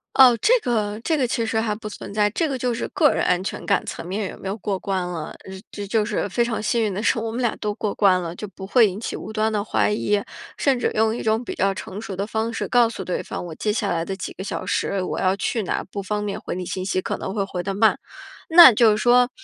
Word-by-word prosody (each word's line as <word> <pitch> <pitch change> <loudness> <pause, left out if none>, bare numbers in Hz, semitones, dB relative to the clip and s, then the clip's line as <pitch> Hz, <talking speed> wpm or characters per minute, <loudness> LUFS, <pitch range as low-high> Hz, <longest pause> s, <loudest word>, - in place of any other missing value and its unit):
哦， 255 -3 +8
这 - - +4
个 215 -3 -1
这 320 - +1
个 255 - +1
其 230 -1 -1
实 220 0 0
还 215 -2 -1
不 215 0 -8
存 205 - -8
在， 210 0 +2
这 320 +5 0
个 265 - -2
就 245 -1 -1
是 230 - -3
个 300 -3 +3
人 - - 0
安 180 0 +2
全 - - -5
感 200 - +1
层 - - -6
面 195 +1 -3
有 - - -11
没 190 - -7
有 200 +3 -3
过 200 -1 -2
关 190 -1 -2
了。 165 -3 -5 0.2
呃， 190 - -9 0.2
这 205 - -6
就 215 +2 +1
是 210 -1 -2
非 205 +5 +1
常 230 -2 -2
幸 230 +2 +1
运 215 - 0
的 195 +2 -3
是， 230 - +2
我 225 0 -3
们 240 - -3
俩 235 -3 0
都 210 -1 -2
过 210 -1 -2
关 190 -3 +4
了， 170 0 -5
就 210 - -6
不 190 0 -10
会 225 +2 +5
引 195 +2 -5
起 - - -4
无 215 - -7
端 220 0 0
的 205 -1 0
怀 210 - +1
疑。 210 -1 +1 0.4
甚 270 -3 +2
至 - - +1
用 220 +1 +2
一 - - -4
种 220 +2 +1
比 - - -5
较 195 0 +1
成 190 +2 -7
熟 205 -4 -6
的 195 +2 -2
方 220 +1 -2
式 225 - -3
告 240 -2 +4
诉 215 -4 -6
对 180 - -2
方， - - -6
我 170 - -7
接 210 - -1
下 205 -2 -1
来 165 -1 0
的 190 +3 -4
几 190 - -6
个 190 - -7
小 - - -4
时， 200 - -1
我 - - -3
要 190 0 +2
去 225 +2 -1
哪 190 - -2
儿 - - -5
不 200 - -4
方 210 +2 -3
便 200 -1 -3
回 - - -5
你 180 - -4
信 185 +1 -4
息， 185 -1 -1
可 - - -3
能 190 - -5
会 200 - 0
回 185 -2 -4
得 195 +1 -3
慢。 220 +2 +3 0.5
那 325 -7 +10
就 230 +1 +5
是 210 - +2
说， 245 +2 +4
210 Hz, 315 characters per minute, -22 LUFS, 195-230 Hz, 0.5 s, 那